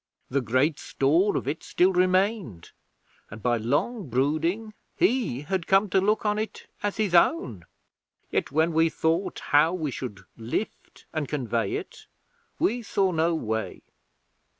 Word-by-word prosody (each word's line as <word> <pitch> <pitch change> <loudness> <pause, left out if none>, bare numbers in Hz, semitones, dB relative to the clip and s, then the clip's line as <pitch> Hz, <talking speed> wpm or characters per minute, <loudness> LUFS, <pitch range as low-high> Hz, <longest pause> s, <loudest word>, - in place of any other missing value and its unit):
The 140 +1 +1
great 130 +6 +1
store 165 +9 +2
of - - -4
it 150 +3 -2
still 185 +2 +2
remained, 185 - +1 0.6
and 110 +1 -10
by 120 -1 +2
long 145 - -1
brooding 160 - 0 0.2
he 230 - +1
had 175 +3 -3
come 195 0 +3
to 190 - +4
look 210 +3 +1
on 210 0 +1
it 220 - -5 0.2
as 205 -1 -2
his 210 -5 0
own. 125 - +2 0.7
Yet - - -1
when 160 +3 +2
we 165 +1 +4
thought 165 +4 -1
how 150 +4 +5
we 155 -5 -2
should 105 -7 -6
lift 120 - -5
and 155 -3 -2
convey 115 -7 -1
it, - - -7 0.5
we 240 +4 +1
saw 195 -3 +1
no 165 0 +1
way. 110 -6 -3
160 Hz, 150 wpm, -26 LUFS, 130-195 Hz, 0.7 s, how